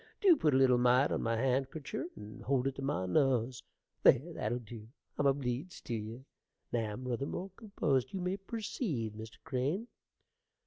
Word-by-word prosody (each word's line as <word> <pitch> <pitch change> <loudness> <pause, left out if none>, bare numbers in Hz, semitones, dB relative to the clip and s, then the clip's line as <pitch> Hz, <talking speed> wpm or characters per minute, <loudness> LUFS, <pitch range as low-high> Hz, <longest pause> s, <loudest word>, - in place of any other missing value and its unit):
Dew 375 -4 +7
put 150 - +2
a - - +6
little 130 -2 +5
mite 125 +3 +4
on - - 0
my 115 0 0
handkercher 135 +4 -1
and 105 +1 -10
hold 135 -1 +1
it 135 - +1
to - - -4
my 135 -9 -1
nuz. 125 +5 +2 0.4
There, 145 +7 +5
that'll 120 - -1
dew: 115 -2 -9 0.3
I'm 145 - +4
obleeged 135 +4 -1
tew - - -3
ye. 115 +4 -5 0.5
Now 110 -3 -1
I'm 125 - -7
ruther 125 +3 -1
more 190 +1 -4
composed: 160 - 0
you 195 - -3
may 180 +2 -1
perceed, 195 - -3
Mr. 110 +1 -9
Crane. 145 - -1
130 Hz, 175 wpm, -33 LUFS, 120-150 Hz, 0.5 s, Dew